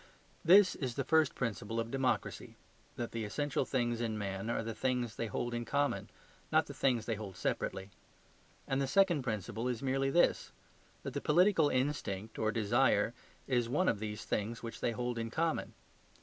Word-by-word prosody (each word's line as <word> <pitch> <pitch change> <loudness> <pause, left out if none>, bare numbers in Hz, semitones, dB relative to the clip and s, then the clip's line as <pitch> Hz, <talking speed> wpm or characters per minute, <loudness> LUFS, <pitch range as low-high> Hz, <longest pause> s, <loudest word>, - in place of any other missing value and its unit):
This 185 +3 +7
is 125 -4 -4
the 135 - -1
first 160 +1 +3
principle 115 -2 -2
of 115 0 -3
democracy: 135 -1 -1 0.4
that 120 - -4
the 115 -1 -3
essential 140 +7 -1
things 120 -3 0
in 110 -2 -1
men 100 +1 -3
are 115 - -1
the 115 0 -4
things 125 0 -1
they 115 - -2
hold 120 +3 -3
in 120 0 -2
common, 140 +4 0 0.4
not - - +4
the - - -8
things 120 -5 +1
they 115 - -1
hold 100 -3 -7
separately. 95 +1 -2 0.8
And 135 +1 0
the 135 - 0
second 175 -1 +4
principle 115 0 -3
is 125 0 -2
merely 135 +1 +1
this: 170 +5 +2 0.5
that - - -5
the - - -2
political 170 -1 +4
instinct 125 -6 -2
or 110 0 +1
desire 115 0 +2 0.3
is 120 -3 +1
one 180 +9 +1
of 105 - +2
these 105 -1 -5
things 115 +3 -2
which 115 - -6
they 120 - 0
hold 120 0 -2
in 115 0 -3
common. 160 +6 -1
120 Hz, 180 wpm, -33 LUFS, 110-135 Hz, 0.8 s, This